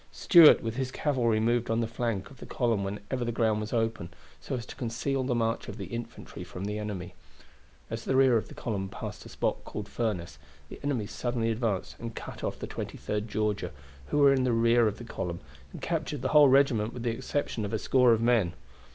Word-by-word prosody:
Stuart 170 - +7
with 115 +1 -3
his 130 -1 -1
cavalry 125 -6 +1
moved 120 +1 +1
on 115 0 +1
the 115 - +1
flank 115 -4 -3
of 135 - -14
the - - -9
column 115 -7 0
whenever 105 +6 -3
the 120 - -1
ground 110 -2 +1
was 105 - -5
open, 115 -6 -1 0.3
so - - -4
as 120 -3 -5
to - - -10
conceal 130 +2 -2
the 125 -1 0
march 115 0 0
of 100 - -7
the 100 - -5
infantry 115 +6 -7
from 90 +2 -7
the 105 +1 -3
enemy. 100 -5 -5 0.8
As 115 0 -4
the 130 - 0
rear 130 -2 +5
of 110 - 0
the - - -12
column 100 -4 -3
passed - - -7
a - - -12
spot - - -2
called 105 - -6
the - - -19
Furnace, 90 -9 -3 0.3
the - - -9
enemy 135 -7 0
suddenly 115 +1 -1
advanced 110 -4 -2
and 115 -1 -6
cut - - -8
off - - -2
the - - -5
23d 105 +1 -4
Georgia, 105 -4 -1 0.4
who - - -1
were 140 -1 +6
in 130 -1 +2
the 125 -2 +2
rear 115 0 +4
of 105 - -2
the - - -9
column, 90 -7 -4 0.3
and - - -10
captured 155 -5 -2
the - - 0
whole 150 -2 +7
regiment 130 -5 +3
with 120 - -6
the 120 - +1
exception 125 -1 -2
of 100 - -3
a 110 - 0
score 125 +2 +4
of 115 -1 +3
men. 115 -8 +3
115 Hz, 225 wpm, -29 LUFS, 105-125 Hz, 0.8 s, Stuart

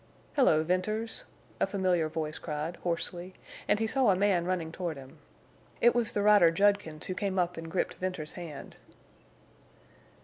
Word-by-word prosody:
"Hello, 160 - +4
Venters!" 215 +6 -1 0.3
a - - +2
familiar 185 -5 +1
voice 155 -1 -4
cried, 155 +2 -4
hoarsely, 175 +1 -3 0.3
and - - +3
he 225 - +1
saw 255 +1 +2
a 190 - +5
man 190 -3 +2
running 175 -3 -2
toward 170 -3 -4
him. 135 -1 -13 0.6
It 240 - +5
was 240 -2 +1
the 205 - 0
rider 205 -5 +7
Judkins 195 -3 +1
who 185 - -3
came 195 0 -2
up 180 -1 +1
and 165 0 -7
gripped 180 - -1
Venters's 180 -5 -4
hand. 165 -6 -9
180 Hz, 160 wpm, -30 LUFS, 165-205 Hz, 0.6 s, rider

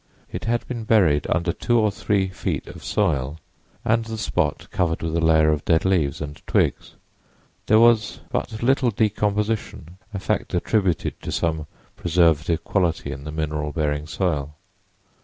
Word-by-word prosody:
It - - -5
had 120 +1 0
been 120 -3 -4
buried 90 -10 +3
under 85 0 +1
two 120 - +1
or 110 -2 +3
three 100 -1 0
feet 90 - -3
of - - -11
soil 80 -8 0 0.5
and 115 +1 +2
the 110 0 -6
spot 105 - -1
covered 85 -3 0
with 80 0 -2
a - - +2
layer 80 -1 +4
of 75 -1 -1
dead 80 +1 +2
leaves 80 -8 +1
and 75 -1 -6
twigs. - - 0 0.7
There 110 - +6
was 115 -1 +4
but 110 +1 -3
little 130 0 +3
decomposition, 105 -4 -1
a 105 - -4
fact 100 -1 -2
attributed 95 -1 0
to - - -5
some 80 -2 -1 0.3
preservative 85 -1 +2
property 85 -5 0
in 70 +2 -7
the 75 - -5
mineral 75 -1 -2
bearing 75 -1 -1
soil. 75 -5 -2
90 Hz, 155 wpm, -23 LUFS, 80-105 Hz, 0.7 s, There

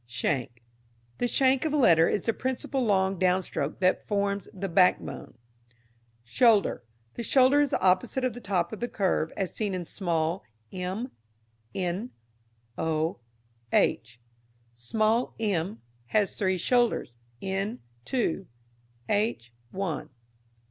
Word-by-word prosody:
Shank. 120 0 -2 0.6
The 245 - +1
shank 260 +1 +3
of 310 -2 -1
a - - +2
letter 165 - +5
is 205 - -1
the 230 - +2
principal 260 +2 -2
long 190 -4 +2
downstroke 180 -5 0
that 185 0 +2
forms 200 -1 -1
the 195 0 -4
backbone. 180 -6 +1 0.9
Shoulder. 210 - +3 0.3
The - - -5
shoulder 260 +4 +5
is 290 - +2
the 190 - 0
outside 185 +8 +2
of 255 -3 0
the 245 - -9
top 185 -2 -1
of 220 - -6
the 240 - -2
curve 185 -7 0
as 190 -3 -2
seen 205 -4 -2
in 180 -1 -4
small 170 -1 -1 0.3
m, 190 +8 -4 0.6
n, 185 +6 -2 0.7
o, 160 -2 0 0.5
h. 115 +1 +1 0.5
Small 215 - 0
m 200 -1 -1 0.2
has 205 - +1
three 190 -2 0
shoulders, 240 - +1 0.3
n 195 - -2 0.3
two, 195 - -1 0.6
h 205 - -1 0.2
one. 185 -5 -3
195 Hz, 130 wpm, -28 LUFS, 170-230 Hz, 0.9 s, letter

